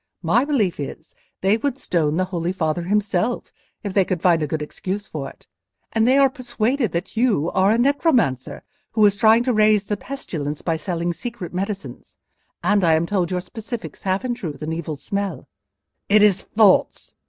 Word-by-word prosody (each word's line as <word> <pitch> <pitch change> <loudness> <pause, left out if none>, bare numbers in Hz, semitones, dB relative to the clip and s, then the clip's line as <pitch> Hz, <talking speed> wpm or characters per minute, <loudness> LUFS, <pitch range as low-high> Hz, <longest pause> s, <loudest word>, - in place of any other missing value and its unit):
My 220 +11 +3
belief 225 - 0
is, 150 +3 -7 0.3
they 195 +3 +3
would 270 +2 -2
stone 165 - 0
the 185 - +1
Holy 175 -2 -2
Father 165 -2 -1
himself, 205 +3 0 0.3
if 200 -3 -4
they 195 - +4
could 180 -1 -2
find 170 -1 +3
a 150 - 0
good 150 +1 -2
excuse 195 +7 -5
for 140 -3 -5
it; - - -19 0.5
and 225 0 +2
they 260 +2 +5
are 275 -1 +6
persuaded 245 -2 -1
that 175 +5 -4
you 220 - +1
are 190 +1 +3
a 220 - +3
necromancer, 245 - +1 0.3
who 215 -2 +4
is 205 -1 +4
trying 220 +2 +5
to 250 0 +1
raise 215 -1 +4
the 205 0 -3
pestilence 155 - -5
by 165 - 0
selling 170 +1 -2
secret 215 -5 -6
medicines—and 200 +1 -4
I 165 -2 +5
am 160 +1 +1
told 180 -2 0
your 180 -1 -1
specifics 225 +4 -7
have 190 +5 -1
in 250 - 0
truth 160 -10 -6
an 160 +1 -3
evil 160 -1 -4
smell." 200 +1 -4 0.6
"It 210 +1 +6
is 195 -2 +4
false!" 210 -3 +2
195 Hz, 185 wpm, -22 LUFS, 170-225 Hz, 0.6 s, are